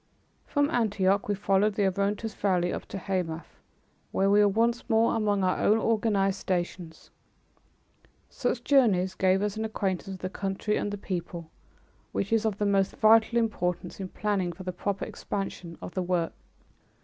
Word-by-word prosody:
From 290 +1 +1
Antioch 200 -6 +1
we 205 - 0
followed 200 +1 +2
the 205 - +2
Orontes 200 +3 -1
Valley 180 -4 0
up - - -6
to - - -6
Hamath, 180 -4 -4 0.5
where 195 +1 +2
we 205 - +5
were 205 - +6
once 230 +4 0
more 225 0 +3
among 205 -3 +1
our 185 0 +1
own 215 - +4
organized 210 -4 +1
stations. 175 -2 -4 1.2
Such 245 -1 -2
journeys 210 -11 +3
give 190 +1 +2
us 210 0 -2
an 220 - -2
acquaintance 195 -4 -2
with 190 -1 -7
the 185 - -3
country 195 +2 -2
and - - -1
the 205 - -4
people, 175 -4 -5 0.6
which 200 +3 -1
is 225 0 +2
of 215 -3 0
the 205 - 0
most 195 -1 +2
vital 225 +2 +5
importance 180 -6 -1
in 190 - -4
planning 200 -4 -1
for 175 +3 -10
the 185 0 -4
proper 200 +2 -2
expansion 185 -4 -5
of - - -7
the 185 - -1
work. 175 -2 -1
200 Hz, 170 wpm, -28 LUFS, 185-215 Hz, 1.2 s, were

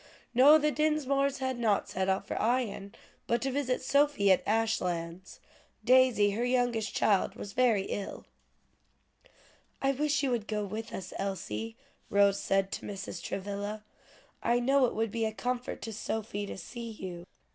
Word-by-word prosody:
"No, 275 +5 +8
the 300 0 +1
Dinsmores 280 -2 +1
had 260 -2 -2
not 215 -4 +1
set 190 +1 -1
out 190 +1 0
for - - -3
Ion, 220 -4 -1 0.3
but 235 - +2
to 270 - 0
visit 260 -2 -1
Sophie 280 -7 +3
at 185 - +4
Ashlands; 185 -5 -1 0.5
Daisy, 250 -5 +5
her 220 +4 -1
youngest 245 -3 0
child, 200 -3 +2
was 200 - -8
very 235 -6 +3
ill." 200 0 -5 1.5
"I 275 - +2
wish 290 +1 0
you 270 - +1
would 230 -3 -1
go 210 -1 -2
with 220 +3 -6
us, 185 -1 -6
Elsie," 200 +3 -4 0.3
Rose 200 0 +4
said 195 0 +1
to - - -5
Mrs. 195 -3 -6
Travilla. 205 +3 -4 0.6
"I 240 +1 +2
know 265 +1 +3
it - - -5
would 225 -1 -1
be 230 0 -1
a 220 - -1
comfort 245 +2 -3
to 225 - -5
Sophie 205 -1 -3
to - - -6
see 230 +6 -7
you." 185 -5 -8
225 Hz, 160 wpm, -30 LUFS, 200-255 Hz, 1.5 s, No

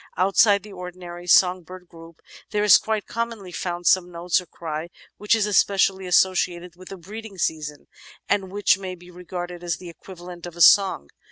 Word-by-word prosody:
Outside 195 +2 +3
the 210 -1 -12
ordinary 180 -1 -9
song 180 0 +4
bird 180 +1 -13
group, 165 -1 -15 0.3
there 210 -1 -1
is 210 -3 +7
quite 220 -2 -3
commonly 230 -5 -5
found 175 0 -5
some 180 0 +3
note 175 +1 0
or 180 - -16
cry 160 0 -6 0.3
which 210 +2 +2
is 220 -2 +1
especially 195 -2 +2
associated 180 -1 +1
with 185 +1 -14
the 195 - -8
breeding 205 +3 -10
season 150 -3 -3 0.4
and 195 -2 -1
which 200 -1 +2
may 185 -1 -6
be 180 0 -16
regarded 175 0 -7
as 170 -4 -2
the 180 +1 -10
equivalent 175 0 -11
of 175 - -11
a 175 - -6
song. 190 - +5
180 Hz, 180 wpm, -23 LUFS, 175-195 Hz, 0.4 s, is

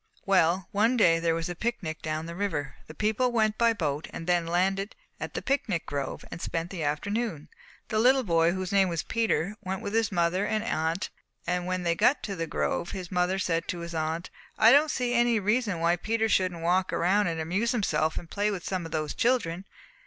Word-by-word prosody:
"Well, 185 -1 +3
one 225 +5 +2
day 165 -7 +5
there 165 -1 +1
was 165 0 -2
a 175 - -3
picnic 175 -6 -3
down 155 0 -3
the 170 - -6
river. 175 -8 -2
The 155 - -11
people 220 +7 +1
went 215 -2 +1
by 235 -1 +5
boat 150 -7 -2
and 165 - -7
then 175 -1 +1
landed 195 +4 0 0.2
at - - -6
the - - -3
picnic 240 - 0
grove, 140 -1 -4
and 170 - -7
spent 165 +1 -3
the 185 -4 -5
afternoon. 160 +3 -2 0.4
The 215 -2 +1
little 260 +3 +5
boy, 165 -4 +3
whose 185 0 -3
name 195 -2 +4
was 170 -2 -2
Peter, 220 -5 0
went 190 0 -4
with 200 - -4
his 225 -2 +1
mother 175 +1 +1
and 215 +1 0
aunt, 165 -4 -1 0.3
and 180 +1 -1
when 185 0 -1
they 170 -1 +2
got 245 - +2
to 200 - -3
the 165 -2 -3
grove 170 - -1
his 185 -2 -6
mother 180 +1 +1
said 170 -3 -1
to 175 - -3
his 170 0 -6
aunt, 160 +2 -2 0.3
'I 225 +1 +7
don't 290 +3 +6
see 245 -3 -1
any 240 -2 +3
reason 210 -2 0
why 170 +1 +2
Peter 225 +4 0
shouldn't 185 -5 +1
walk 180 +2 +2
around 200 +4 +2
and 165 -1 -2
amuse 190 +9 0
himself 175 -9 0
and 170 - -6
play 205 +1 +1
with 195 -4 -4
some 185 -3 -2
of - - -14
those 155 -2 -2
children.' 195 -8 0
185 Hz, 215 wpm, -28 LUFS, 165-215 Hz, 0.4 s, I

